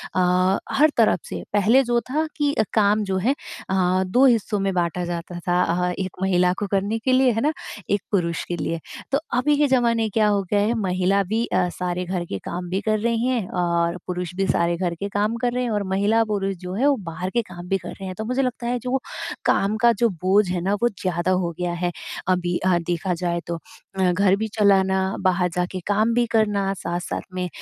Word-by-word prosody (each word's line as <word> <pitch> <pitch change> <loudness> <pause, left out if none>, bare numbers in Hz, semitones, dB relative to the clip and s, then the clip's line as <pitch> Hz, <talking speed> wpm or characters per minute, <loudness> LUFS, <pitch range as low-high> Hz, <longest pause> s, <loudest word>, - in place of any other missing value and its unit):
अ, 185 +1 +3 0.2
हर 300 +3 +5
तरफ 225 -2 +4
से - - -5
पहले 225 +7 +4
जो 240 0 +1
था 310 +3 +1
कि 290 -1 +1
अ, 220 - +2
काम 210 0 +3
जो 190 -1 -1
है 240 +9 +1 0.3
अ, 185 0 +2
2 245 +9 +3
हिस्सों 225 -4 +2
में 195 0 0
बाँटा 175 0 -1
जाता 175 0 -5
था 175 0 +3
अ, 180 +1 0
1 190 -1 -2
महिला 180 -1 +3
को 205 - -2
करने 200 +3 0
के 260 +4 0
लिए, 255 0 +4
है 225 0 -1
ना? 305 +4 +1 0.4
1 205 -1 +1
पुरुष 170 -5 0
के 175 - -3
लिए। 165 +1 -2 0.3
तो 275 - +3 0.2
अभी 280 +5 +3
के 295 - +3
ज़माने 235 -4 +2
क्या 215 -1 +3
हो 205 -1 +2
गया 205 - +3
है? 210 +3 +2
महिला 185 0 +1
भी 220 +5 -1
अ, 180 -1 +1
सारे 180 0 -3
घर 180 -1 -2
के 100 - -2
काम 180 +1 -4
भी 190 +2 0
कर 215 0 +1
रही 230 +1 0
हैं, 240 -7 0
और 170 -1 0
पुरुष 180 -1 -3
भी 195 +1 0
सारे 170 -1 +2
घर 175 -2 -1
के 200 - -2
काम 210 +3 0
कर 245 -1 +1
रहे 250 0 0
हैं 245 - -1
और 205 -1 0
महिला-पुरुष 205 0 +1
जो 180 0 -5
है 260 +7 +2
वो 285 - +4
बाहर 180 +3 -4
के 235 +5 +1
काम 175 -5 -10
भी 195 +1 +1
कर - - -9
रहे 195 - -9
हैं। 185 -1 -5
तो 220 - -4
मुझे 250 +3 0
लगता 250 -2 -2
है 245 +1 0
जो 255 +2 -1 0.5
काम 205 +2 +2
का 235 0 +6
जो 235 - +5
बोझ 190 +3 +2
है 180 -1 -1
ना 190 +3 0
वो 240 - +4
ज़्यादा 185 -3 -2
हो 180 -2 +1
गया 175 -1 -1
है, 175 0 -1 0.4
अभी 180 -1 +1
हाँ, 180 -2 +3
देखा 175 +1 -1
जाए 170 0 -1
तो। 170 - -2 0.4
अ, 185 -1 +3
घर 190 +1 +3
भी 220 +2 -2
चलाना 190 -2 +4 0.2
बाहर 180 -1 +2
जाके 180 +1 -2
काम 215 +3 +2
भी 240 0 +3
करना, 205 -3 +2
साथ-साथ 175 -2 -4
में 180 -1 -2
195 Hz, 230 wpm, -23 LUFS, 180-225 Hz, 0.5 s, का